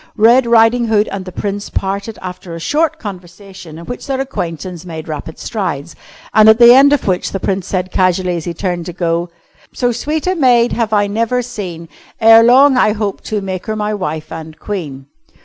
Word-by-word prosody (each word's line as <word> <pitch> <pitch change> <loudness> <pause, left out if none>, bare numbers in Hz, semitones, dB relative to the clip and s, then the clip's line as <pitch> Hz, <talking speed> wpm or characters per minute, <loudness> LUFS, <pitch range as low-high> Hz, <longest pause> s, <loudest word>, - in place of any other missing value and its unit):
Red 235 +3 +5
Riding 235 +1 +4
Hood 215 -1 +2
and 195 -1 -5
the 185 - -8
Prince 200 +2 -4
parted 200 +3 -3
after 180 -2 -7
a - - -7
short 315 - 0
conversation 185 - -10
in 170 - -10
which 245 - -7
their 270 -1 -2
acquaintance 175 - -5
made 160 -3 -8
rapid 155 0 -6
strides, 175 -7 -4 0.4
and 215 0 +6
at 220 - +6
the 240 0 +8
end 275 +2 +6
of 290 - +1
which 185 -2 -1
the 195 - -3
Prince 190 -2 -2
said 185 -1 -3
casually 185 -1 +1
as 165 - -5
he 175 - -3
turned 175 -2 -3
to 175 - -6
go: 170 0 -1 0.4
"So 245 -1 0
sweet 300 +6 -3
a 370 - +1
maid 245 -7 +3
have 230 -2 -1
I 205 -1 +3
never 230 +4 -1
seen, 185 -9 -7 0.3
Ere 225 0 +7
long 260 +3 +5
I 215 -4 +3
hope 210 -2 -3
to 215 -2 -2
make 185 -2 -5
her 220 - -2
my 210 0 -2
wife 160 -6 -4
and 160 -1 -8
queen." 150 -9 -6
200 Hz, 200 wpm, -15 LUFS, 175-235 Hz, 0.4 s, the